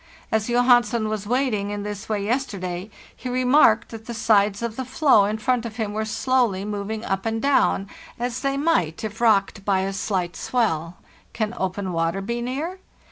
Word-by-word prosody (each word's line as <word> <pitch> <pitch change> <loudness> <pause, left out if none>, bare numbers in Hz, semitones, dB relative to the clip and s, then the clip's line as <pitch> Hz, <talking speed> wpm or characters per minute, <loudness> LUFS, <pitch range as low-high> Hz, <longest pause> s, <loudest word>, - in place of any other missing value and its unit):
As 220 +1 0
Johansen 240 -2 +3
was 210 -2 -3
waiting 240 -5 0
in 205 0 -4
this 205 -1 -6
way 205 -2 -1
yes 260 +5 0
terday, 185 0 -5 0.3
he 255 - -6
remarked 250 -2 +4
that 225 -1 -10
the 235 - -5
sides 210 -2 +2
of 230 -2 -3
the 260 - -3
floe 260 -4 +4
in 210 +2 -1
front 245 +2 0
of 230 -2 -6
him 220 -3 -3
were 215 +1 -1
slowly 220 -3 +1
moving 210 +1 -4
up 195 0 -1
and 225 0 -1
down,* 270 -7 +2 0.3
as 245 +1 -2
they 275 0 -1
might 275 - +1
if 220 +1 -5
rocked 200 -3 +3
by 195 -2 +2
a 195 +1 -2
slight 185 -3 -2
swell. 170 -9 -1 0.4
Can 220 -1 -2
open 190 0 -3
water 165 +3 0
be 235 +5 -3
near? 295 +10 -3
220 Hz, 190 wpm, -23 LUFS, 200-245 Hz, 0.4 s, remarked